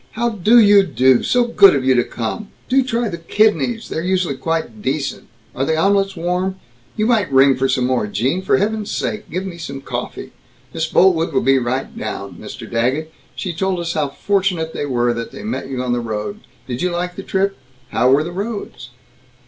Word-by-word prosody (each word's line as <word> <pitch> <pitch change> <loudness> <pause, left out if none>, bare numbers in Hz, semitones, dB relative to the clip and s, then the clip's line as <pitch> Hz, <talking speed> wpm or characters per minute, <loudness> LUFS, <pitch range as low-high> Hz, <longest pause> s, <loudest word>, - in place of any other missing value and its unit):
how 235 +2 0
do 220 +2 +3
you 205 -3 +7
do, 130 -8 +3
so 245 0 +2
good 200 -7 +6
of 130 -2 -1
you 130 - +5
to 120 -1 +3
come, 120 - -5 0.2
do 265 +1 +3
try 240 -2 -1
the 170 -4 -5
kidneys, 220 +5 +1
they're 160 - -3
usually 180 -4 0
quite 135 -6 -3
decent, 135 +3 -3 0.3
are 130 - -2
the 160 +3 0
omelets 195 +2 +2
warm, 180 +2 -2 0.4
you 215 - +1
might 220 - +2
ring 135 0 +5
for 135 +1 0
some 125 - +1
more, 125 -4 0
Gene, 130 - -1
for 190 +1 +2
heaven's 210 +1 -1
sake 215 - -3
give 185 +2 -3
me 175 -3 -7
some 140 -4 -6
coffee, 135 - -6 0.4
Miss 160 0 -1
Boltwood 170 -1 +3
will 130 - +1
be 135 +1 +4
right 130 +2 -3
down, - - -5
Mr. - - -9
Daggett, 130 +7 -1 0.2
she 180 - -4
told 185 +2 -1
us 170 -1 -2
how 150 -3 0
fortunate 180 0 -1
they 145 - -3
were 120 -2 +1
that 115 -1 -5
they - - -9
met 215 - -4
you 130 -2 -3
on 125 -1 0
the 120 - 0
road, 115 - -4 0.3
did 125 -1 -5
you 180 - +1
like 180 +1 -3
the - - -6
trip, 195 +1 0 0.3
how 125 - +2
were 140 +3 +4
the 170 - -5
roads?" 200 - -5
170 Hz, 205 wpm, -19 LUFS, 130-200 Hz, 0.4 s, you